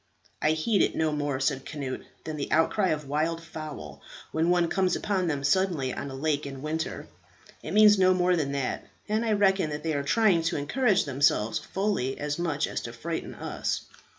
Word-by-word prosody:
"I 155 - +3
heed 190 +7 +1
it - - +2
no 160 -1 +1
more," 145 -2 -1
said 135 0 0
Cnut, 140 -4 -4 0.2
"than 155 - -5
the 145 -2 -4
outcry 165 +5 +3
of 150 -4 -1
wild 155 +4 0
fowl, 155 - -8 0.3
when 160 +2 +1
one 175 -1 +3
comes 185 0 +1
upon 190 -3 0
them 145 -4 -1
suddenly 155 -5 +1
on 140 - -5
a 135 - -7
lake 145 +1 -1
in 135 0 -8
winter. 160 +2 -3 0.5
It - - -7
means 210 -1 +7
no 185 0 +5
more 180 0 +3
than 150 -5 -1
that; 140 -2 -2 0.2
and 215 +2 0
I 225 -2 +1
reckon 195 -5 +3
that 150 0 -5
they 160 -1 0
are 140 - 0
trying 195 +3 +3
to 165 - 0
encourage 195 - +2
themselves 130 -6 +2
fully 190 -10 -1
as 150 +2 -2
much 165 -4 0
as - - -4
to 115 - -7
frighten 160 +8 -5
us. - - -3
155 Hz, 200 wpm, -27 LUFS, 140-185 Hz, 0.5 s, means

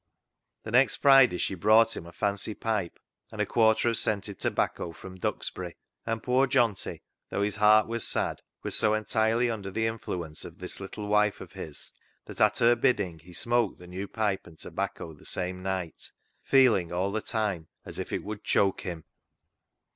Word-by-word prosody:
The 110 - -6
next 125 0 +4
Friday 135 -9 +6
she 95 - -1
brought 110 +5 +4
him 85 - -7
a - - -10
fancy 100 +3 -2
pipe 105 -6 -2 0.3
and - - -10
a - - +2
quarter 110 0 +3
of 115 - +1
scented 105 -4 +2
tobacco 85 - -1
from 95 +2 -11
Duxbury, - - -3 0.3
and 115 -1 -2
poor 130 +2 +3
Johnty, 120 -7 +1 0.3
though 100 - -1
his 105 0 -1
heart 105 0 +6
was 115 0 -2
sad, - - -1 0.2
was - - -3
so 110 0 +3
entirely 110 +2 +1
under 100 -3 -5
the 110 +4 -1
influence 90 -8 -3
of - - -10
this - - -7
little 100 +2 -6
wife 105 0 +2
of - - -10
his 75 -3 -9 0.3
that - - -7
at - - +4
her 120 +1 +5
bidding 100 -9 +1
he 85 +3 -16
smoked 120 +3 +1
the 90 - -13
new 95 +3 -6
pipe 105 -3 -1
and 80 -2 -15
tobacco 80 - -5
the 75 - -18
same 90 0 -3
night, 95 -3 -4 0.3
feeling 115 -11 +4
all 95 +3 0
the 110 +1 -2
time 105 -9 -2 0.2
as - - -7
if - - -5
it - - -2
would 105 0 -6
choke 100 -1 +2
him. 85 -5 -6
105 Hz, 185 wpm, -28 LUFS, 90-115 Hz, 0.3 s, Friday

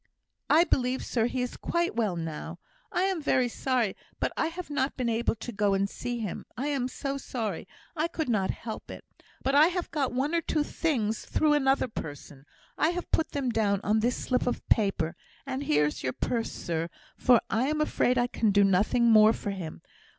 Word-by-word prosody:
"I 325 +2 +7
believe, 255 -6 0
sir, 230 -2 +1
he 250 0 -1
is 250 - -4
quite 340 0 -1
well 215 -6 +1
now. 165 0 -5 0.3
I 360 - +1
am 380 -4 0
very 255 -3 +2
sorry, 240 -3 0 0.2
but - - -1
I - - +1
have 335 -1 -7
not 275 -1 -1
been 250 -2 0
able 230 0 +1
to 230 +2 -7
go 205 -2 +1
and 195 +1 +1
see 245 +4 -4
him. 215 -6 -5
I 275 +5 -1
am 270 -4 0
so 275 +1 -4
sorry 220 -10 -4 0.3
I 320 +1 +1
could 325 -2 -3
not 210 -6 +1
help 225 -2 -6
it. - - -9 0.4
But 270 - +1
I 295 +3 +7
have 360 0 -3
got 280 -5 0
one 270 +6 -1
or 335 - +2
two 305 -2 0
things 235 -10 -1
through 305 -1 +2
another 270 -2 +3
person. 145 - -8 0.3
I 315 - +4
have 350 0 -4
put 320 - +1
them 270 -4 0
down 205 -3 +1
on 215 +1 +2
this 240 +3 +1
slip 250 -1 0
of 245 - -2
paper; 195 -7 +2 0.3
and 265 0 -3
here 150 0 +3
is 150 - -3
your 130 - -2
purse, 230 -2 -2
sir, 165 0 -3 0.3
for 245 -2 +5
I 240 +4 +2
am 305 +1 0
afraid 255 -4 +2
I 245 - +3
can 225 -2 0
do 200 0 +5
nothing 205 +5 +3
more 215 0 +7
for 205 - -4
him. 175 -5 -7
245 Hz, 210 wpm, -28 LUFS, 205-280 Hz, 0.4 s, I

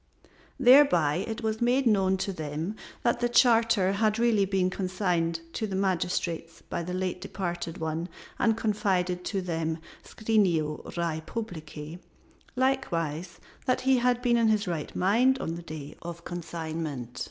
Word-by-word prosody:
Thereby 245 - +6
it 225 +1 -5
was 220 0 -1
made 250 +3 +3
known 190 -4 +3
to 195 - -3
them 160 +4 -4 0.3
that 235 0 +2
the 240 0 +1
charter 230 -5 +4
had 215 +2 +1
really 225 -4 +3
been 190 -1 +1
consigned 180 -3 -1
to 220 - -2
the 195 - -4
magistrates 170 -3 -1
by - - -4
the 180 +2 -4
late 185 -1 -2
departed 175 -3 -4
one 160 +2 -3 0.3
and 225 -1 +3
confided 185 -5 0
to 195 -2 -1
them 165 -2 -2 0.3
scrinio 180 -9 +1 0.2
rei 165 -2 -1
publicæ, 160 -6 -6 0.6
likewise 175 - -1 0.3
that 255 - +2
he 265 0 +4
had 245 0 +1
been 240 -1 +3
in 230 -1 +3
his 215 -2 +2
right 165 -4 -4
mind 235 +8 +3
on 165 - -3
the 170 - -6
day 155 -3 -8
of 170 0 -5
the 170 - -21
consignment. 160 -7 -5
185 Hz, 155 wpm, -28 LUFS, 165-225 Hz, 0.6 s, Thereby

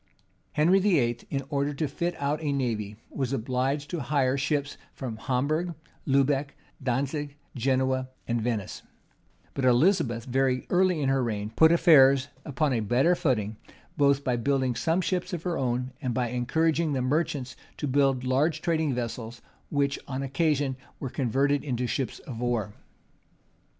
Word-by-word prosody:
[*] - - -41
Henry 170 +6 +4
VIII., 145 - +2
in 140 -1 -2
order 140 0 0
to 155 +1 -1
fit 170 +5 -2
out 145 +2 -1
a 150 -2 -1
navy, 110 -7 -2 0.2
was 135 -3 -2
obliged 135 +4 -1
to 175 - -2
hire 135 -1 +1
ships 140 +1 -1 0.2
from 125 -4 -5
Hamburgh, 155 +9 -1 0.3
Lubec, 140 +1 +2 0.3
Dantzic, 140 +3 -2 0.2
Genoa, 130 +1 0 0.2
and 120 -1 0
Venice, 110 -4 -3 0.7
but 135 - -3
Elizabeth, 125 - +3
very 130 0 +1
early 180 -3 +3
in 135 - +1
her 135 0 +2
reign, 105 -2 -3
put 160 0 +6
affairs 140 -5 +6
upon 145 -1 0
a 120 - +1
better 120 - +3
footing; 110 - 0 0.4
both 140 -1 +3
by 125 -3 +1
building 130 +1 +1
some 160 +10 0
ships 180 +1 -2
of 170 -2 -3
her 175 -2 -1
own, 125 -2 -1
and 125 -4 -2
by 125 -2 0
encouraging 155 +6 +1
the 130 - 0
merchants 145 -2 -1 0.2
to - - -3
build 135 -1 +2
large 140 +5 +1
trading 160 -4 0
vessels 115 -1 -5 0.3
which, 140 -1 0
on 135 0 -3
occasion, 140 -1 0 0.2
were 135 - -5
converted 140 +2 +1
into 125 -3 -2
ships 130 +1 -2
of 120 -5 -8
war. 120 -4 -1
135 Hz, 155 wpm, -27 LUFS, 125-150 Hz, 0.7 s, put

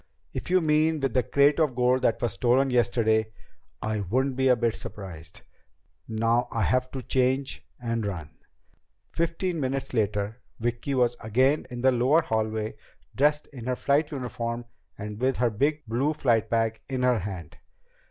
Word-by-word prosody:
"If - - -5
you 185 0 +4
mean 155 0 +2
with 135 -4 -1
the 125 - +3
crate 140 +4 +3
of 150 -6 +2
gold 125 +1 +3
that 115 - +2
was 120 -5 -1
stolen 130 +5 +2
yesterday, 110 -3 +2 0.5
I 110 0 -1
wouldn't 130 +8 0
be 130 +1 +2
a 125 - +6
bit 115 -1 0
surprised. 95 -7 -9 0.6
Now 115 +2 +1
I 115 - 0
have 130 +6 +1
to 130 -2 -5
change 130 +2 0 0.2
and 115 -2 -2
run." 85 -7 -4 0.8
Fifteen 170 +1 -1
minutes 135 -1 -2
later 105 0 -1 0.2
Vicki 120 +4 -2
was 120 -1 +2
again 130 +7 +2
in 120 -1 -6
the 130 +1 +5
lower 130 +7 +3
hallway, 110 0 -2 0.4
dressed 150 +2 +2
in 125 -3 -8
her 125 - +1
flight 145 +4 +1
uniform 120 -3 -4 0.3
and 105 0 -6
with 130 +1 +1
her 120 -2 +2
blue 140 +2 0
flight 115 -6 +2
bag 115 -1 0
in 130 -2 -1
her 125 -2 +3
hand. 90 -5 -7
125 Hz, 160 wpm, -27 LUFS, 110-135 Hz, 0.8 s, a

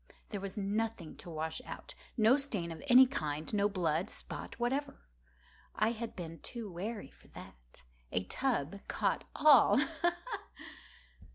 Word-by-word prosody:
There 205 -3 -4
was 195 +1 -6
nothing 210 -3 -2
to - - -10
wash 160 0 -3
out—no 225 +2 0
stain 215 -12 -2
of 165 - -7
any 255 0 +9
kind—no 165 - -1
blood 170 -3 0
spot - - -7
whatever. 270 +4 -1 0.7
I 215 +2 +2
had 235 0 -5
been 165 -3 -7
too 230 - -6
wary 200 -2 -5
for - - -21
that. - - -14 0.3
A 90 - 0
tub 175 - 0
had 200 - -11
caught - - 0
all—ha! 290 0 +6 0.4
ha! 425 -5 -4
205 Hz, 140 wpm, -33 LUFS, 165-240 Hz, 0.7 s, any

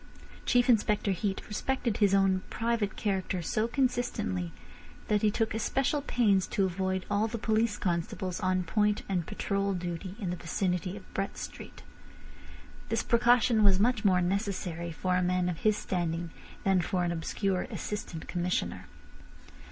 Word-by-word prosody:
Chief 245 0 +4
Inspector 210 -3 +3
Heat 190 +1 -2
respected 235 +1 -1
his 200 -2 +4
own 190 -1 +3
private 230 -3 -1
character 190 -3 -1
so 215 +7 0
consistently 240 - -1 0.6
that 210 -1 +3
he 215 - +4
took 220 +1 0
especial 270 +6 0
pains 210 -8 +2
to 195 - +1
avoid 190 0 -1
all 205 +2 +1
the 230 +1 -4
police 220 -1 +1
constables 180 +1 -2
on 185 -2 +1
point 210 +4 +1
and 180 -4 -1
patrol 200 -2 -1
duty 175 +1 -4
in 190 -5 -2
the - - -2
vicinity 180 +2 -2
of 190 - -14
Brett 195 +1 -2
Street. - - -8 1.1
This - - 0
precaution 235 -2 +4
was 195 -2 +5
much 235 +1 +2
more 185 -3 +4
necessary 180 -3 -2
for 180 +2 0
a - - +2
man 180 0 +1
of 175 -2 -2
his 215 -1 +2
standing 170 -3 -2 0.3
than 190 -2 +3
for 180 0 0
an 175 - 0
obscure 180 +3 -1
Assistant 190 -6 -5
Commissioner. 180 0 -2
195 Hz, 150 wpm, -30 LUFS, 180-215 Hz, 1.1 s, was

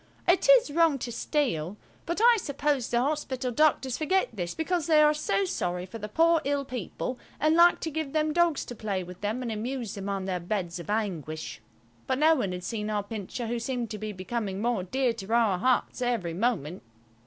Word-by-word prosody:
It 360 +7 +3
is - - +6
wrong 325 -2 +3
to 240 -2 -5
steal, 210 - -1 0.3
but 340 +3 -1
I 470 +1 +6
suppose 285 - -1
the 235 - +2
hospital 265 -2 -1
doctors 265 -1 +2
forget 375 +5 +1
this 175 -5 -4
because 330 0 -1
they 315 -2 +5
are 300 0 +6
so 200 -10 0
sorry 180 0 -2
for 210 +5 -9
the 210 0 -6
poor 330 +6 +4
ill 280 0 -1
people 250 +1 -5 0.2
and 310 +2 +3
like 345 +1 +6
to 320 - -3
give 310 -2 -3
them 310 0 +1
dogs 340 -3 +2
to 245 - -8
play 200 -4 -2
with 180 0 -11
them 215 +5 -2
and 235 - -3
amuse 235 +1 -4
them 200 0 -5
on 195 -1 -2
their 185 -2 -2
beds 175 -1 -3
of 170 - -9
anguish. 170 - -3 0.5
But 260 - +1
no 310 +3 +5
one 245 -11 -1
had 180 0 -5
seen 210 +3 -3
our 210 -1 -1
Pincher, 215 +3 -5
who 235 +1 -2
seemed 240 -1 -3
to 210 - -5
be 215 +1 -4
becoming 195 +1 -4
more 235 -2 0
dear 245 +6 0
to 220 -2 -8
our 220 -6 +3
hearts 255 +3 +1
every 230 -9 -1
moment. 185 - -1
240 Hz, 210 wpm, -28 LUFS, 195-295 Hz, 0.5 s, is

